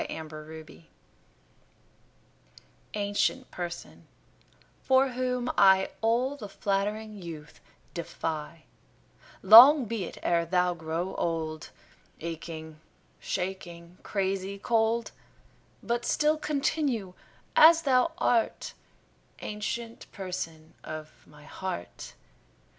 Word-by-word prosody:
7 160 -1 -6
Autoplay 155 +1 -11 2.1
Ancient 205 +5 -1
Person, 175 -1 -7 0.7
for 265 0 +3
whom 250 0 -2
I 190 -1 +5
All 240 +5 +1
the 215 -8 -9
flattering 205 +2 -2
youth 160 -3 -9 0.3
defy, 160 -1 -5 0.8
Long 245 +8 +10
be 220 -4 -3
it - - -9
e'er 170 -1 +2
thou 180 +1 +1
grow 165 +2 -4
old, 160 -2 -3 0.5
Aching, 160 -1 -7 0.4
shaking, 175 - -5
crazy 195 0 -2
cold; 230 +2 +1 0.7
But 235 0 -1
still 305 +3 +2
continue 280 - -1 0.4
as 330 +1 +8
thou 270 +3 +3
art, 230 -2 0 0.7
Ancient 225 +2 -5
Person 165 -5 -6
of 155 0 -7 0.2
my 150 0 -17
heart. 155 - -7
195 Hz, 90 wpm, -28 LUFS, 165-235 Hz, 2.1 s, Long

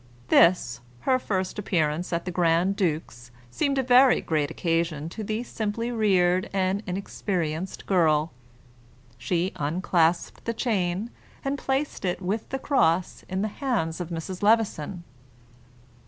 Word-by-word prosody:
This, 145 -9 +4 0.2
her 255 -1 +2
first 190 -5 -2
appearance 170 -4 0
at 170 -1 -1
the 180 - -3
grand 175 +2 +2
duke's, 155 - -2 0.2
seemed 275 - 0
a 265 - +2
very 255 +1 +6
great 150 -3 0
occasion 165 -2 -1
to 215 +5 -6
the 215 +3 -2
simply 230 0 -3
reared 185 -5 +2
and 195 0 0
inexperienced 180 -2 -3
girl. 160 -4 +2 0.9
She 170 +9 0
unclasped 165 +2 0
the 230 - -2
chain, 205 -2 -1 0.3
and 275 +1 0
placed 270 +1 -2
it 180 -2 -1
with 195 +4 -3
the 270 - -2
cross 180 - +1
in 190 +1 -1
the - - +1
hands 190 -12 -1
of 175 - -5
Mrs. 175 +2 -5
Levison. 205 -6 +1
185 Hz, 135 wpm, -26 LUFS, 165-215 Hz, 0.9 s, very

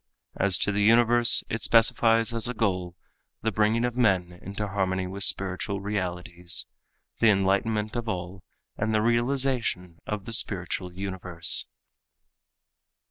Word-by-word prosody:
As 100 -1 +3
to 105 - 0
the 105 +1 -1
universe 120 +2 +5
it 115 - -4
specifies 115 0 +4
as 115 0 +1
a 125 - -5
goal 90 -5 -2 0.5
the 110 - 0
bringing 110 +3 +1
of 120 -1 -3
men 95 -8 +1
into 100 +2 -5
harmony 95 -2 -2
with 95 +2 -5
spiritual 95 +1 -2
realities, 90 -3 -4 0.5
the 115 - +4
enlightenment 105 +2 0
of 120 -1 -4
all 90 0 -6 0.3
and 110 +1 -1
the 110 - +2
realization 120 -7 -1
of 105 -2 -5
the 115 - -5
spiritual 90 -3 -2
universe. 90 -2 +2
100 Hz, 135 wpm, -25 LUFS, 95-115 Hz, 0.5 s, universe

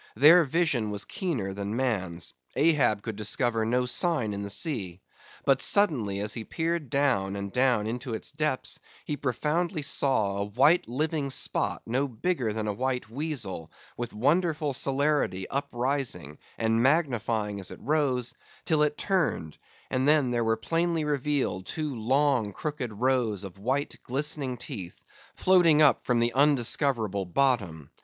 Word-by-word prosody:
Their 165 +4 +7
vision 140 -7 0
was 105 0 -3
keener 130 - -3
than 100 +2 -4
man's; 95 -10 -2 0.2
Ahab 145 -10 +3
could 115 - -5
discover 115 +2 0
no 125 +2 +1
sign 125 -4 +1
in 100 - -4
the 100 - -5
sea. 100 - -1 0.5
But 135 -1 +3
suddenly 125 - +3
as 105 +1 -2
he 115 - -4
peered 165 +1 -2
down 125 -8 +1
and 100 -1 -5
down 125 -4 +2
into 120 +1 -4
its - - -4
depths, 150 -3 -1 0.3
he 150 - -2
profoundly 150 - -1
saw 110 -8 +1
a 100 - -1
white 135 - +3
living 150 +3 -1
spot - - -1
no 130 +5 0
bigger 125 -1 -1
than 110 0 -3
a 105 - -1
white 125 0 -3
weasel, 120 - -4 0.3
with 120 -1 -5
wonderful 150 +4 +1
celerity 135 -8 0
uprising, 130 - -2 0.2
and 115 0 +1
magnifying 120 -8 +1
as 95 - -3
it - - -8
rose, 135 -4 0 0.3
till 155 -2 +2
it 150 0 +1
turned, 165 - -1 0.4
and 130 +1 +1
then 150 -4 +4
there 120 -1 0
were 115 0 +1
plainly 165 +5 0
revealed 145 -10 -1
two 155 -3 -3
long 125 -1 +1
crooked 145 +1 -4
rows 115 -3 0
of 95 -1 -9
white, 130 +7 -1
glistening 135 -1 -2
teeth, 110 -8 -8 0.3
floating 175 -5 +4
up 150 -2 +5
from 125 - +2
the 120 0 +1
undiscoverable 125 -6 +2
bottom. 90 - 0
125 Hz, 150 wpm, -27 LUFS, 110-150 Hz, 0.5 s, Their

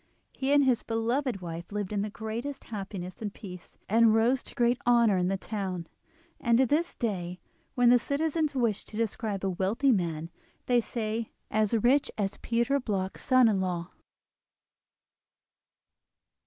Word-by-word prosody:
He 270 +1 -1
and 285 0 +6
his 255 -3 +3
beloved 230 0 -1
wife 170 +1 -7
lived 205 -1 -3
in 205 - 0
the 210 - -2
greatest 230 +6 -5
happiness 195 -3 -6
and 210 -2 -3
peace, 180 -3 -11
and 225 +1 +5
rose 240 +4 +3
to - - -14
great 240 0 +2
honour 235 -4 +5
in 180 -1 +1
the 195 +1 0
town. 190 -4 -4 0.5
And 235 -1 +3
to 265 - +5
this 310 +7 0
day, 180 -6 -3 0.4
when 245 -1 +5
the 245 - +6
citizens 305 +3 -1
wish 230 -5 +1
to 215 - -9
describe 220 -3 -2
a - - +1
wealthy 205 +10 +1
man, 165 -5 -1 0.3
they 245 -1 +3
say: 225 -1 -3 0.2
"As 215 +1 +2
rich 250 +6 +3
as 200 -1 -1
Peter 235 +4 +1
Bloch's 195 -6 -3
son 255 -2 +5
in 200 -4 +2
law!" 175 -2 -3
220 Hz, 155 wpm, -29 LUFS, 195-245 Hz, 0.5 s, and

